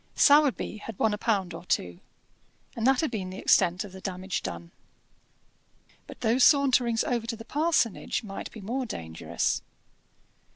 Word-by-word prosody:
Sowerby 285 -7 +4
had 215 -1 -9
won 220 -1 +2
a - - -2
pound 195 -7 0
or - - -8
two, 90 - -2 0.8
and 230 +1 0
that 265 -1 +4
had 315 -6 -1
been 195 -5 -4
the 185 - -8
extent 180 -1 +3
of 205 - -10
the 190 0 -11
damage 185 0 -4
done. 85 0 -7 1.4
But - - -12
those 245 +2 +3
saunterings 255 -5 +4
over 235 -2 -2
to 230 - -2
the 225 0 -11
parsonage 295 - 0
might 195 -2 -7
be 220 - -10
more 245 +6 -3
dangerous. 80 - -2
220 Hz, 160 wpm, -27 LUFS, 185-250 Hz, 1.4 s, Sowerby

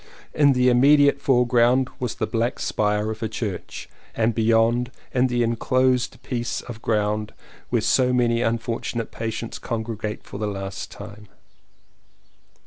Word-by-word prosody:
In 145 -2 +4
the 125 0 +2
immediate 140 +3 +5
foreground 125 0 +3
was 125 -3 -3
the - - -1
black 115 +3 -1
spire 105 +1 0
of 110 +1 -7
a 110 - -2
church; 105 -3 -5 0.3
and 115 0 +1
beyond, 115 +2 +2 0.2
the 125 -1 +2
enclosed 125 +2 +1
piece 120 -2 -3
of 115 -2 -9
ground 105 -1 -1 0.3
where - - 0
so 125 -1 +3
many 120 -2 +2
unfortunate 115 0 -2
patients 115 0 -5
congregate 110 -2 -4
for 100 - -9
the 105 - -1
last 95 -1 -5
time. 105 +1 -11
115 Hz, 135 wpm, -23 LUFS, 110-125 Hz, 0.3 s, immediate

